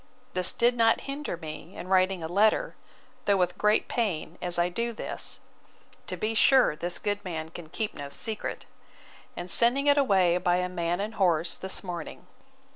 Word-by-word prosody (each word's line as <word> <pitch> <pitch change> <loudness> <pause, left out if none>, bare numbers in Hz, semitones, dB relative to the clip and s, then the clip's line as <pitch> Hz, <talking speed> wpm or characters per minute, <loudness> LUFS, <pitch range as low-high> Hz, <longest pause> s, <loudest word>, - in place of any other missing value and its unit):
This 185 -1 +5
did 240 +1 +2
not 225 -1 +3
hinder 280 - -5
me 160 +2 -9
in 180 - -7
writing 185 -1 +2
a - - -3
letter, 215 - +2 0.5
though 200 -1 +3
with 180 -1 0
great 210 +1 +2
pain, 180 -8 -2
as 175 -1 -1
I 175 0 +2
do 230 +6 -3
this, - - -4 0.7
(To - - -4
be 215 +1 -1
sure 255 - +5
this 175 +3 -1
good 205 0 -3
man 160 -4 -5
can 160 -1 -10
keep 215 +5 -3
no 140 -1 -7
secret!) 215 +8 -3 0.7
and 175 - -5
sending 245 +4 +5
it 285 0 +5
away 185 -9 +3
by 175 -1 +2
a 180 0 0
man 175 0 -2
and 210 +3 -3
horse, 175 -5 +1
this 190 0 -2
morning. 175 -4 -7
185 Hz, 180 wpm, -27 LUFS, 175-220 Hz, 0.7 s, This